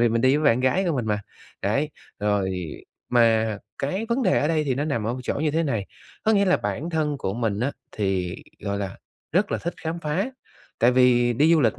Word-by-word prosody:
vì 120 - +5
mình 115 +1 +1
đi 130 +3 +4
với 155 - -1
bạn 125 -4 +4
gái 130 +9 +2
của 160 - +1
mình 120 -3 -1
mà. 105 -1 +1 0.4
Đấy, 140 +9 +1 0.3
rồi 105 -2 +1 0.6
mà 115 -3 +3 0.2
cái 190 +11 -2
vấn 250 +3 +2
đề - - +3
ở 150 - +1
đây 155 -2 +1
thì 135 -3 +1
nó 140 +3 -1
nằm 120 -8 -1
ở 120 - 0
một 130 - -6
chỗ - - -1
như 150 +1 0
thế 160 +3 +1
này. 115 -10 -1 0.4
Có 220 - +4
nghĩa 200 -2 +4
là 185 -1 +4
bản 165 +4 -3
thân 150 -3 0
của 95 -7 -2
mình 110 -3 -1
á, 140 +3 0 0.2
thì, 95 -3 -1 0.2
gọi 100 0 -2
là, 100 -2 -4 0.4
rất 190 +5 +2
là - - 0
thích 175 - -4
khám 165 +1 -3
phá. 170 - -1 0.5
Tại 120 +2 +5
vì 125 -1 +4
đi 150 +7 +4
du 160 - +5
lịch 115 -4 +2
130 Hz, 240 wpm, -24 LUFS, 110-155 Hz, 0.6 s, vì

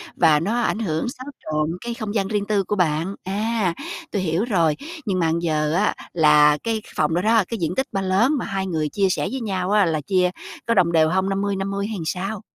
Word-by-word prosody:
và 160 -3 +4
nó 220 +8 0
ảnh 220 - 0
hưởng, 160 -3 -1
xáo 255 +1 -9 0.2
trộn 155 +1 -1
cái 235 0 -4
không 215 -2 -5
gian 195 -2 +1
riêng 205 -1 -1
tư 205 -2 +1
của 210 - -2
bạn. 170 +1 0
À, 205 -1 -1 0.4
tôi 200 - -1
hiểu 170 +4 0
rồi! 170 -9 +2 0.3
Nhưng 190 -3 0
mà 165 - +2
bây 165 +1 +1
giờ 155 -2 0
á 200 +5 +2 0.2
là 150 -2 +5
cái 225 -1 -1
phòng 155 +1 +1
đó 175 - +1
đó, 220 +1 +4
cái 230 - -4
diện 165 -5 -2
tích 265 +1 0
ba 195 - -1
lớn 190 +7 +2
mà - - -3
hai 195 -1 -2
người 155 -4 -1
chia 195 +3 +1
sẻ - - 0
với 265 -1 -3
nhau 190 -3 -2
á, 210 -2 +4
là 155 -2 0
chia 180 +3 +2 0.4
có 230 - +2
đồng 180 -5 +3
đều 160 -1 +4
hông? 190 +2 +1
50-50 195 0 -1
hay 220 - -4
làm - - -4
sao? 195 +5 -3
190 Hz, 240 wpm, -22 LUFS, 165-210 Hz, 0.4 s, là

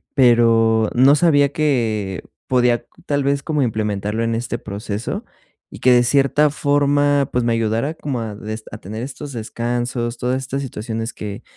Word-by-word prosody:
pero 115 -4 +4
no 130 +3 +6
sabía 145 -3 +4
que 110 -10 0 0.2
podía 125 -2 +2 0.2
tal 145 -1 0
vez 140 0 0
como 150 -3 -1
implementarlo 105 -1 -1
en 115 0 0
este 120 +1 -3
proceso 105 +1 -5 0.5
y - - -11
que 130 - +4
de 120 0 +5
cierta 140 +4 +3
forma, 145 -1 +2
pues 125 -1 0
me 115 - +2
ayudara 115 +6 0
como 140 -6 -4
a 110 -2 -5
des 110 +1 -6
a 105 - -6
tener 110 +5 -6
estos 140 +2 -7
descansos, 120 +1 -3
todas 125 +1 -1
estas 135 +1 -4
situaciones 115 -2 -5
que 100 -1 -7
120 Hz, 160 wpm, -20 LUFS, 110-140 Hz, 0.5 s, no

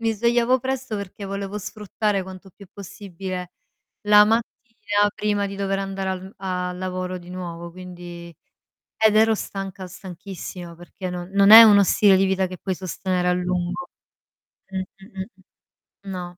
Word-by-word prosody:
mi 225 -1 +1
svegliavo 235 +3 +2
presto 260 -3 -3
perché 200 0 -7
volevo 200 +1 -4
sfruttare 210 -1 -2
quanto 190 +1 -11
più 200 +2 -15
possibile 185 -2 -7 0.5
la 210 0 +7
mattina 215 -2 0
prima 205 -1 0
di 200 0 -7
dover 195 0 -1
andare 195 0 -3
al 190 +1 -6
a 180 -1 -3
lavoro 185 0 -4
di 175 0 -13
nuovo 170 -2 -6
quindi 175 -1 -10 0.6
ed 220 -1 +4
ero 220 +1 +5
stanca, 195 -2 -6
stanchissima 180 -1 -9
perché 180 +2 -7
non 180 0 -6
non 200 0 +5
è 225 +1 +14
uno 205 -2 +7
stile 195 0 +5
di 190 - +3
vita 190 0 +1
che 185 0 -8
puoi 190 +1 -3
sostenere 185 0 -2
a - - +4
lungo. 180 0 -2 0.8
Mh, 190 - -4
mh, 195 +1 -10
mh. 190 -1 -11 0.5
No. 180 -2 -6
190 Hz, 155 wpm, -23 LUFS, 180-205 Hz, 0.8 s, è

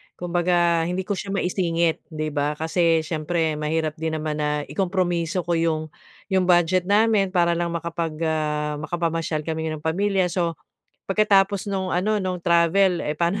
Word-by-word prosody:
Kumbaga 175 -1 +1
hindi 180 +2 -2
ko 190 0 -3
siya - - -6
maisingit, 170 -3 0
'di 155 -2 -4
ba? 145 0 -1
Kasi 165 +1 +1
siyempre 160 0 -1
mahirap 155 +1 -2
din 160 -1 -2
naman 155 -1 -3
na 150 0 0
ikompromiso 175 -1 -1
ko 170 -1 0
'yong 155 -2 -1 0.4
'yong 185 -1 +2
budget 175 +1 +3
namin 205 -2 +3
para 170 -1 +4
lang 170 0 0
makapag, 170 -1 -3
ah, 150 -1 -1
makapamasyal 165 -1 -2
kami 160 0 -3
ng 150 - -12
pamilya. 185 +2 +1
So, 170 -2 -1 0.5
pagkatapos 200 -1 +3
no'ng 190 -3 -2
ano, 210 +3 +1
no'ng 185 -2 -3
travel, 170 +2 +3
eh, 150 - -3
paano 175 +5 0
170 Hz, 155 wpm, -23 LUFS, 160-185 Hz, 0.5 s, para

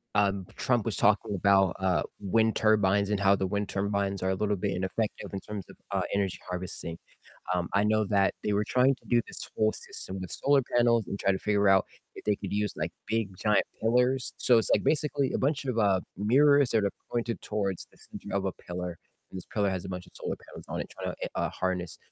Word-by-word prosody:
um, 100 -2 +2
Trump 120 -4 +1
was 115 - -1
talking 105 0 +2
about, 95 0 +4
uh, 95 -2 +2 0.2
wind 110 +3 +2
turbines 100 -2 +3
and 105 -1 0
how 100 0 +5
the 95 - -1
wind 100 +1 -1
turbines 100 -1 -1
are 95 - +1
a 95 - +1
little 105 +1 0
bit 100 +1 -2
ineffective 95 +4 -2
in 95 - -2
terms 105 -3 -6
of, - - -12 0.2
uh, - - +1
energy 95 -3 0
harvesting, 90 -2 -4 0.6
um, 90 -1 -1
I 100 - +4
know 110 0 +3
that 100 -1 +2
they 105 - 0
were 105 +1 +2
trying 130 +2 +4
to - - -29
do 120 - +4
this - - -7
whole 110 0 +3
system 95 0 -8
with 90 -2 -6
solar 140 0 +3
panels 115 -2 +4
and 100 - -4
try 100 - +2
to 95 - -1
figure 100 0 +2
out 95 -1 +5 0.3
if - - -9
they 105 - +2
could - - -6
use 105 0 0
like 80 +2 -2 0.2
big 110 -1 0
giant 105 +2 +3 0.2
pillars. 125 +3 +2
So 120 -2 +4
it's 110 - 0
like - - +1
basically 145 -3 +1
a - - 0
bunch 140 +1 0
of, 125 -4 -2
uh, 100 -4 +3 0.2
mirrors 140 +7 +4
that 110 -2 +2
are 100 - +1 0.2
pointed 120 -1 -2
towards 100 -4 -2
the - - -22
center - - -9
of 100 - -1
a 95 - -1
pillar, 90 -1 -6 0.3
and 95 - -6
this 90 - -10
pillar 100 -2 +2
has 95 -2 -3
a - - -6
bunch 90 -1 -6
of - - -19
solar - - -3
panels - - -10
on - - -3
it - - -6
trying - - -5
to, - - -5
uh, - - 0
harness, 90 -2 -3
100 Hz, 230 wpm, -29 LUFS, 95-115 Hz, 0.6 s, how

